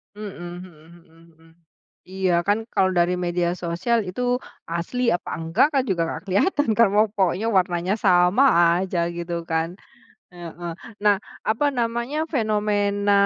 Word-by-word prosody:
Mhm 210 -2 -7 0.3
mhm 180 - -15 0.3
mhm 165 +1 -22
mhm. 165 0 -22 0.6
Iya 190 -1 0
kan 215 +2 +1
kalo 185 - +3
dari 175 +1 +3
media 175 0 0
sosial 180 +7 -1
itu, 220 +7 -5 0.4
asli 230 +9 -1
apa 175 - -3
enggak 165 - +2
kan 270 -2 +2
juga 175 -3 0
nggak - - -5
kelihatan 230 - +1
kan, 230 -2 +6
mau 215 +1 +5
pokoknya 195 +1 0
warnanya 180 +1 0
sama 180 +6 +4 0.4
aja 185 -2 -2
gitu 170 0 -5
kan. 165 +3 -2 0.6
Heeh, 175 0 -7 0.3
nah 205 -1 +5 0.3
apa 225 +7 +1
namanya, 235 +2 -2 0.2
fenomena 205 -3 +1
190 Hz, 140 wpm, -23 LUFS, 175-220 Hz, 0.6 s, kan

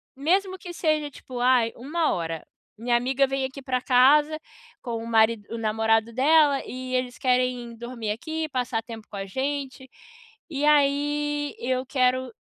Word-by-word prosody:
Mesmo 375 +7 +1
que 355 -1 -9
seja 310 -3 0
tipo, 255 -2 -9
ai, 245 -2 +3
1 310 +6 -1
hora. 165 -2 -4 0.3
Minha 240 +2 0
amiga 265 +3 +2
vem 270 0 -1
aqui 270 +1 -7
pra 255 -1 -1
casa 290 +5 +4 0.4
com 235 -3 -4
o - - -7
marido 220 -1 +3
o 230 - -3
namorado 225 0 +1
dela, 285 +2 +4
e 255 0 -6
eles 250 -1 -2
querem 250 -2 0
dormir 235 -2 -5
aqui, 315 +7 -4
passar 250 -4 -2
tempo 225 -2 -10
com - - -10
a 195 - -4
gente. 265 +3 -4 0.6
E 290 -2 -1
aí, 290 0 +1
eu 255 +1 -1
quero 255 -1 +1
255 Hz, 160 wpm, -25 LUFS, 235-290 Hz, 0.6 s, casa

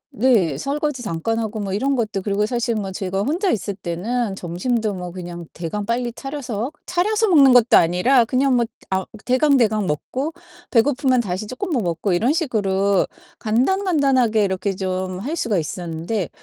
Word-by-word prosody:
네 205 - +3
설거지 280 - -2
잠깐 205 +4 -2
하고 220 -1 -3
뭐 195 -1 -3
이런 270 +7 +1
것도 220 -5 -1
그리고 205 +1 0
사실 235 0 -1
뭐 200 -3 -3
제가 190 0 -2
혼자 335 - 0
있을 200 -1 -2
때는 195 +5 -2
점심도 205 +5 -2
뭐 180 -2 -6
그냥 175 -1 -7
대강 175 +5 -4
빨리 240 +2 -1
차려서 260 -3 -4
차려서 420 +5 +1
먹는 280 -7 +7
것도 245 -1 +6
아니라 180 +10 +4
그냥 260 +2 +2
뭐 235 - +2 0.3
아 190 0 0 0.2
대강대강 250 -6 +3
먹고 260 - -3 0.4
배고프면 255 +1 +3
다시 195 -1 -4
쪼끔 260 - -5
뭐 260 -6 +1
먹고 175 +3 -1
이런 230 +11 +2
식으로 200 - +1 0.3
간단간단하게 260 - +2
이렇게 190 +1 -2
좀 185 -1 -3
할 290 +9 -3
수가 220 - 0
있었는데 170 +3 -3
220 Hz, 340 characters per minute, -21 LUFS, 190-260 Hz, 0.4 s, 먹는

